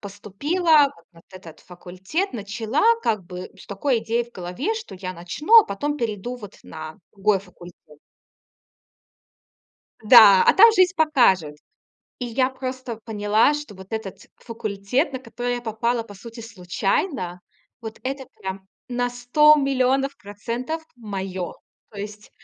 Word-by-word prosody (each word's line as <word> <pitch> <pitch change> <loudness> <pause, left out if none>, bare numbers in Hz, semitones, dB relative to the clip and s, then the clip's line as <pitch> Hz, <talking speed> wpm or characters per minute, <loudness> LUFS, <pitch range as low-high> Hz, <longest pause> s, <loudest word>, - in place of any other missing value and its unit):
поступила 285 - +2 0.2
на 165 - -18
этот 185 -4 -13
факультет. 185 - -5
Начала 220 - -2 0.2
как 215 -4 0
бы 180 +1 -8
с - - -14
такой 230 +5 0
идеей 230 +2 -1
в 240 - -22
голове, 185 - -3
что 455 +1 -8
я 185 0 -6
начну, 295 - +4
а - - -12
потом 290 +9 -3
перейду 230 0 -4
вот 205 -5 -12
на 155 0 -9
другой 200 0 +1
факультет. 180 -2 -14 2.3
Да, 210 -4 +8
а - - +7
там 455 +3 +9
жизнь 370 -3 +4
покажет. 195 - +3 0.6
И 250 - -4
я 255 +2 +1
просто 255 -3 -6
поняла, 215 +3 +2
что 295 -8 -7
вот 190 0 -13
этот 220 -4 -6
факультет, 225 - -2
на 260 - -4
который 245 -1 -4
я - - -5
попала, 235 +1 -1
по 210 -2 -13
сути, 230 +3 -11
случайно, 195 - -2 0.4
вот 220 -2 -9
это 265 +1 -4 0.2
прям 190 0 -6 0.2
на 245 0 -1
100000000 275 +1 +3
процентов 235 +10 -5
моё. 190 -5 -5 0.4
То 205 - -11
есть 210 +1 -8
225 Hz, 135 wpm, -23 LUFS, 195-260 Hz, 2.3 s, там